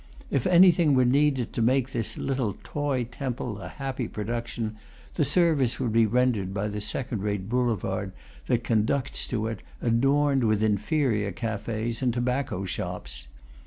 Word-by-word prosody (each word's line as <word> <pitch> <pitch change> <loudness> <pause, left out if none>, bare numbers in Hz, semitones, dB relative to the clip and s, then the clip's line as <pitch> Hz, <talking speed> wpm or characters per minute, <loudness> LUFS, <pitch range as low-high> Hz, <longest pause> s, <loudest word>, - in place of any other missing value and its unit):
If 135 - +1
anything 175 -4 +6
were 130 -1 +4
needed 135 -1 +2
to 115 - -1
make 130 +2 +2
this 115 -4 -3
little 130 -7 -1
toy 145 -4 -1
temple 120 -3 -4
a 90 - -7
happy 130 +2 -4
production, 115 0 -4 0.4
the 155 - +1
service 150 -4 +2
would 125 -4 0
be 115 -1 +5
rendered 110 -5 +1
by 105 +1 -1
the 105 0 -4
second 110 +1 -3
rate 100 -2 -2
boulevard 105 -5 -1 0.4
that 120 -1 +1
conducts 120 +5 0
to 110 -3 -2
it, 110 -3 -3 0.2
adorned 135 +3 +2
with 110 -1 +2
inferior 105 0 +1
cafes 110 +3 -3
and 125 -2 +2
tobacco 120 -4 -1
shops. 75 - -5
120 Hz, 150 wpm, -26 LUFS, 105-135 Hz, 0.4 s, anything